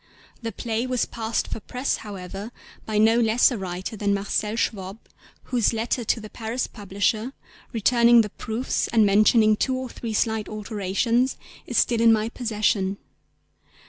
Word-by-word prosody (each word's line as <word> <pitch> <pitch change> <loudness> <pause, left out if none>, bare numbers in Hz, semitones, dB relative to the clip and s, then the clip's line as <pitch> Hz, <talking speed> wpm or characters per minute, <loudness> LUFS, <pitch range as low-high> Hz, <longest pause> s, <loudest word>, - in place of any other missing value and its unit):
The 230 -1 -4
play 230 +2 -2
was 255 -1 0
passed 225 -1 -2
for - - -5
press, 250 +5 -2
however, 200 +1 -7 0.4
by 215 -1 -1
no 225 +2 +5
less 230 +3 +4
a 245 - -2
writer 185 +3 -5
than 205 -1 0
Marcel 210 +2 -1
Schwob 195 -3 -2 0.5
whose 240 -2 +1
letter 230 +2 -1
to 230 - 0
the 215 - -8
Paris 225 +3 -3
publisher, 210 +4 -2 0.4
returning 235 +1 +5
the 210 -2 -4
proofs 230 +3 -2
and 225 -2 +4
mentioning 215 +2 +5
two 260 +4 0
or 255 -1 -4
three 230 -2 -5
slight 220 -1 0
alterations, 215 +4 0 0.3
is - - -2
still 235 -2 +3
in 230 0 +6
my 220 0 +2
possession. 210 -5 0
220 Hz, 155 wpm, -24 LUFS, 210-235 Hz, 0.5 s, in